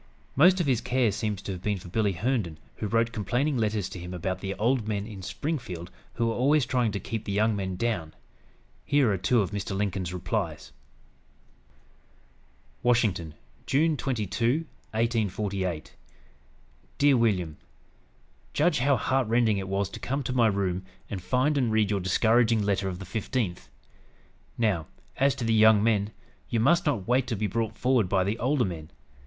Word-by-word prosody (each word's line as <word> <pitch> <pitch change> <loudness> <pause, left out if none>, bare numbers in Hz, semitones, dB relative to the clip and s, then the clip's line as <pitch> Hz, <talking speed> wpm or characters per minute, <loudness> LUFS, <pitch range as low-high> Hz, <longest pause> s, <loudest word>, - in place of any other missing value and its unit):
Most 180 +7 +6
of 175 - +1
his 125 -5 +1
care 125 -3 +1
seems 105 -1 -3
to - - -4
have 90 -2 -6
been 105 +1 -1
for 90 - -11
Billy 100 +2 0
Herndon, 105 -5 -1 0.2
who 105 - -3
wrote 115 +2 +1
complaining 125 +6 0
letters 105 -4 0
to 95 - -8
him 90 +1 -7
about 95 +1 -3
the 95 0 -4
"old 115 0 +1
men" 100 -2 -2
in 105 -3 -8
Springfield 100 - -4 0.2
who 115 - 0
were 115 - +1
always 140 +3 +3
trying 125 -3 +1
to 100 - -2
"keep 115 0 -4
the 100 - -3
young 105 +2 +2
men 95 -2 -3
down." 90 -7 -2 0.7
Here 140 -6 +3
are - - 0
two 120 +4 +3
of 100 - -2
Mr. 100 -1 -3
Lincoln's 95 -3 -2
replies: 90 -2 -3 2.1
"WASHINGTON, 105 -10 +1 0.3
June 155 +4 +3
22, 120 - 0 0.2
1848. 100 -6 -1 1.0
"DEAR 140 -1 +5
WILLIAM: 95 -10 +1 1.0
"Judge 155 -1 +2
how 135 +2 +3
heart 130 +2 +1
rending 115 -3 +2
it 95 - -5
was 100 +1 0
to - - -7
come 135 +2 -2
to 125 - -3
my 120 -3 +4
room 95 -3 -1 0.3
and 95 -3 -4
find 130 +8 +1
and 120 -4 +1
read 110 -2 +2
your 100 - +1
discouraging 110 +4 +3
letter 100 -1 0
of 90 - -5
the 95 - -8
15th. 105 -2 -3 0.9
Now, 100 -9 +1 0.3
as 135 0 +3
to 130 - -5
the 115 - +2
young 110 -1 +6
men, 105 -2 +2 0.4
you 115 - 0
must 170 - +3
not 115 -10 0
wait 125 +1 +2
to 115 - -1
be 105 +1 -1
brought 110 +2 -2
forward 125 -7 +2
by 95 -1 +3
the 105 +4 -2
older 130 0 +2
men. 80 -4 -6
110 Hz, 175 wpm, -27 LUFS, 95-125 Hz, 2.1 s, Most